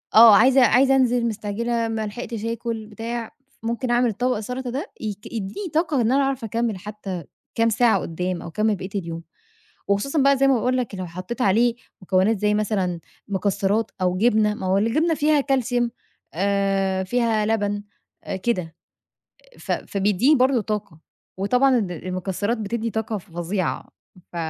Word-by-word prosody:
آه، 225 -1 +10
عايزة 265 +3 +6
عايزة 265 +4 +4
أنزل، 245 -2 +2
مستعجلة، 230 +2 -2
ما 225 -1 -2
لحقتش 225 0 -6
آكُل، 230 -1 -3
بتاع 230 +1 -5 0.3
ممكن 235 +2 -2
أعمل 240 -1 +2
طبق 250 +4 0
السلطة 250 +4 -4
ده 275 - -4
ي 215 -2 -3
يديني 225 - -5
طاقة 310 -4 +1
إن 230 +1 +2
أنا 275 +2 +3
أعرف 270 -2 -1
أكمل 225 -1 -1
حتى 195 -3 -6 0.3
كام 230 0 +3
ساعة 225 +1 +3
قدام 180 +2 -3
أو - - -8
أكمِّل 215 +5 0
بقية 190 0 -7
اليوم. 165 -3 -4 0.7
وخصوصًا 270 +9 +1
بقى 275 0 +5
زي 275 +1 +3
ما 270 - +5
باقول 250 +2 +1
لك 245 -5 -2
لو 185 -1 -5
حطيت 185 +9 -5
عليه 230 +4 +3 0.3
مكونات 190 +4 +2
زي 210 +1 +1
مثلًا 195 -5 -1 0.3
مكسرات 200 +2 0
أو 180 0 +1
جبنة، 215 0 +3
ما 190 - -5
هو 190 +1 +3
الجبنة 310 +11 +2
فيها 300 -1 +3
كالسيوم 250 -3 0 0.4
آآ، 195 0 +1
فيها 225 0 +1
لبن، 205 -2 0 0.6
كده 180 -9 -1 0.8
ف - - -3
فبيدّيني 205 +8 +2
برضه 260 -2 +3
طاقة 210 -6 -4 0.4
وطبعًا 250 +7 +3
الم-المكسرات 185 +3 -2
بتدي 225 +2 -2
طاقة 220 -1 -2
فظيعة 175 +1 -3 0.4
ف - - -8
220 Hz, 155 wpm, -23 LUFS, 195-245 Hz, 0.8 s, آه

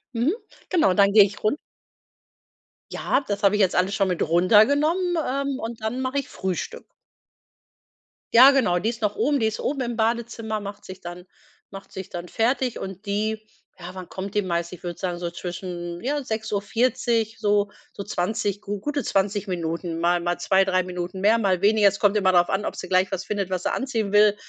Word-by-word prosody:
Mhm. 240 +7 +2 0.4
Genau, 315 - +3
dann 200 0 +4
gehe 210 0 +8
ich 195 +1 -4
run 215 +7 +2 1.3
Ja, - - 0
das 205 0 -3
habe 200 +1 +4
ich 210 - +2
jetzt 190 -2 +2
alles 185 +3 +1
schon 195 - +1
mit 180 - -2
runter 185 +6 +5
genommen, 335 +6 +1
ähm, 275 +1 -2
und 225 0 -6
dann 220 +4 -2
mache 260 +2 -1
ich 275 - -6
Frühstück. 185 -2 -4 1.5
Ja, 255 +4 +10
genau, 240 -11 +2
die 215 - 0
ist 230 -2 -6
noch 205 0 0
oben. 280 +5 +1
Die 225 - +1
ist 220 0 -1
oben 275 0 -2
im 240 -1 -2
Badezimmer, 225 -1 -1
macht 200 0 -8
sich 190 0 -10
dann 175 +1 -8 0.4
macht 195 0 -11
sich 190 -1 -7
dann 175 0 -6
fertig 245 +4 0
und 190 +2 -7
die 215 +2 -2 0.3
ja, 175 - -8
wann 185 -1 -8
kommt 195 +2 -6
die 210 - +3
meist? 170 -2 -2
Ich 180 - -11
würde 175 -1 -5
sagen, 180 -2 -2
so 175 - -3
zwischen, 175 -1 -6
ja, 285 +3 -1
6:40, 225 0 -1
so 205 -1 +2 0.2
so 200 - -7
20, 205 +1 -2
gu 205 -1 -4
gute 290 +4 -2
20 205 +1 0
Minuten, 170 -1 -3
mal 175 +1 +2
mal 175 0 -1
2, 190 +2 +3
3 185 -1 +2
Minuten 180 +1 -5
mehr, 215 +3 +4
mal 190 -4 +1
weniger. 210 0 +5
Es 200 0 +1
kommt 205 0 +3
immer 190 -2 +3
darauf 175 -1 +4
an, 195 +2 -1
ob - - -3
sie - - -7
gleich 185 +1 +2
was 190 -1 -3
findet, 200 -3 -3
was 185 -1 -1
sie - - 0
anziehen 230 -7 -2
will 210 0 +5
205 Hz, 205 wpm, -24 LUFS, 185-225 Hz, 1.5 s, Ja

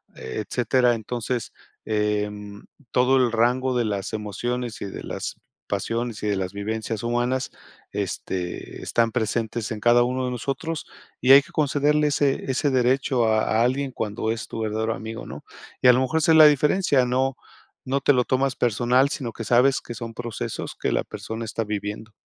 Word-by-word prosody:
etcétera, 120 - 0
entonces, 120 +1 -3 0.3
em, 105 -1 -2 0.3
todo 125 +1 +4
el 125 -2 +3
rango 125 +3 +1
de 120 - +1
las 100 0 -3
emociones 115 +3 -3
y - - -3
de 95 - -7
las - - -5 0.3
pasiones 115 -1 -2
y - - 0
de 105 - +1
las 95 -1 -2
vivencias 110 +2 -3
humanas, 120 +2 0 0.4
este, 90 -2 -4
están 115 -1 +1
presentes 115 -1 -1
en 110 - -3
cada 120 +2 +5
uno 130 +1 -1
de 125 - -2
nosotros 150 +6 -3 0.4
y 130 - +5
hay 140 +1 +10
que - - -18
concederle 150 0 +2
ese 140 -2 +1
ese 130 +2 +1
derecho 130 -1 +2
a 110 +1 +2
alguien 130 +2 0
cuando 110 0 -2
es 115 -1 -7
tu - - -5
verdadero 110 +1 -1
amigo, 110 0 -7
¿no? - - -9 0.4
Y - - +5
a 125 - +9
lo 125 - +2
mejor, 130 +5 0
esa 160 +1 +4
es 160 - +6
la 155 -1 +10
diferencia, 150 -1 +3
no 130 +2 0 0.5
no 135 +2 0
te 145 - +4
lo 125 -2 +2
tomas 130 0 +1
personal, 120 +3 +3
sino 130 -5 -4
que 115 - -6
sabes 125 +4 +4
que - - -8
son 115 0 -6
procesos 120 -1 -5
que - - 0
la - - +1
persona 110 +1 -6
está 115 +1 -2
viviendo. 105 +1 -5
120 Hz, 180 wpm, -24 LUFS, 110-130 Hz, 0.5 s, hay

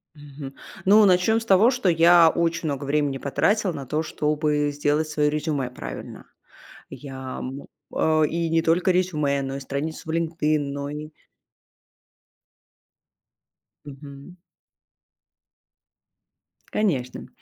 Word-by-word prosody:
Мгм. 140 -2 -10 0.3
Ну, 210 +2 +6
начнем 190 +4 +3
с - - -8
того, 215 +4 +5
что 245 -8 0
я 170 0 +6
очень 170 0 -1
много 140 0 -4
времени 145 -1 0
потратила 195 +8 0
на 140 -3 -6
то, 150 +5 -1
чтобы 150 -1 0
сделать 145 +2 0
свое 150 -1 +1
резюме 150 -3 -2
правильно. 65 - -9 0.7
Я, 130 -2 -8
м, 135 +2 -7 0.3
э, 155 -1 +2
и 170 0 -2
не 165 0 +3
только 170 +3 +2
резюме, 155 -6 +1
но 135 0 -4
и - - -6
страницу 145 +4 -5
в - - -2
LinkedIn, 160 -2 0
но 140 0 -4
ни 150 +1 -6 2.8
Мгм. 140 +3 -11 2.4
Конечно. 135 - -1
150 Hz, 115 wpm, -24 LUFS, 140-170 Hz, 2.8 s, Ну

